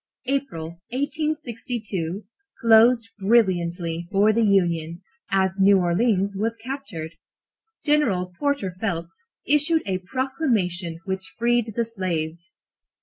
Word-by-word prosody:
April, 170 - -3
1862, 235 - -3 0.3
closed 230 0 +5
brilliantly 175 -5 +1
for 210 +2 +4
the 230 - +2
Union, 175 -5 +1 0.3
as 190 0 +1
New 195 +1 +6
Orleans 195 +2 +1
was 225 +3 -1
captured. 225 - -6 0.7
General 215 - +2
Porter 285 -11 0
Phelps 170 - -3 0.2
issued 300 +2 +3
a 185 -2 -1
proclamation 190 - -1
which 190 0 -4
freed 235 -1 +1
the 235 - +1
slaves. 175 -5 -3
200 Hz, 100 wpm, -24 LUFS, 175-240 Hz, 0.7 s, New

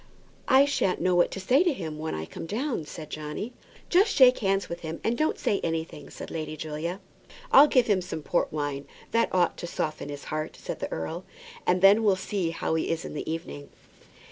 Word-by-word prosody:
"I 265 +2 +6
shan't 280 -10 0
know 185 - +2
what 175 0 +4
to - - -6
say 255 - +4
to 355 - +3
him 160 - -5
when 160 +1 -3
I 80 0 -4
come 165 - -8
down," 230 - -2
said 155 0 -9
Johnny. 155 +10 -5 0.3
"Just 395 +5 +3
shake 255 -2 +7
hands 195 -2 +1
with 170 - -5
him 160 0 -6
and 230 - +1
don't 310 +5 0
say 200 - 0
anything," 160 -3 -3
said - - -9
Lady 155 -1 -4
Julia. 160 +4 -4 0.5
"I'll 285 +2 +9
give 255 -4 +4
him 205 -4 +2
some 175 -4 -6
port 175 - 0
wine 145 -2 -3 0.2
that 230 0 +2
ought 180 -1 +2
to 175 - -5
soften 155 -3 -3
his 145 -1 -7
heart," 155 0 -3
said - - -6
the - - -4
earl, 165 - -4 0.4
"and 180 +1 +2
then 200 +3 +7
we'll 200 -3 +4
see 190 -2 -2
how 165 - -2
he 160 - 0
is 165 0 -2
in - - -6
the 150 - -4
evening." 160 -3 -6
175 Hz, 215 wpm, -27 LUFS, 155-215 Hz, 0.5 s, I'll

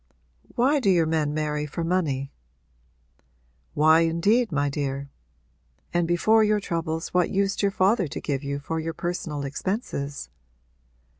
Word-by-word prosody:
'Why 270 +4 +3
do 235 - +1
your 175 -3 +4
men 155 -2 0
marry 150 0 -2
for 165 +4 -4
money?' 155 -6 -1 1.4
'Why 155 +2 +5
indeed, 180 +8 +2
my 145 -1 +1
dear? 140 -1 -3 0.8
And 175 -1 +1
before 215 +6 +4
your 210 0 +2
troubles 165 -4 -3
what 180 -1 +1
used 195 0 0
your 200 - +3
father 195 0 +2
to - - -6
give 140 -2 -3
you 140 0 -3
for 160 +3 -4
your 165 +1 -3
personal 155 -5 -3
expenses?' 145 - -4
165 Hz, 140 wpm, -25 LUFS, 145-190 Hz, 1.4 s, Why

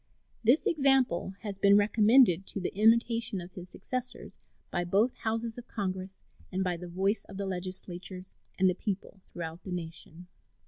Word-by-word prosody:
This 245 +7 +4
example 270 - +2
has 205 -3 -5
been 200 +1 +6
recommended 210 -2 +5
to - - -4
the 180 - -3
imitation 225 0 +3
of 175 +1 -9
his 180 0 -10
successors 255 +6 -5 0.4
by 175 - 0
both 200 +8 +2
Houses 225 +1 -3
of 245 - -12
Congress 190 -2 -4 0.3
and 190 0 0
by 180 -1 0
the 175 +1 -8
voice 195 +4 0
of 195 - -10
the 200 - -2
legislatures 185 0 -5 0.2
and 190 - +4
the 180 - +3
people 195 0 -5
throughout 165 0 -7
the 190 - -7
nation. 170 0 -6
195 Hz, 165 wpm, -30 LUFS, 180-225 Hz, 0.4 s, been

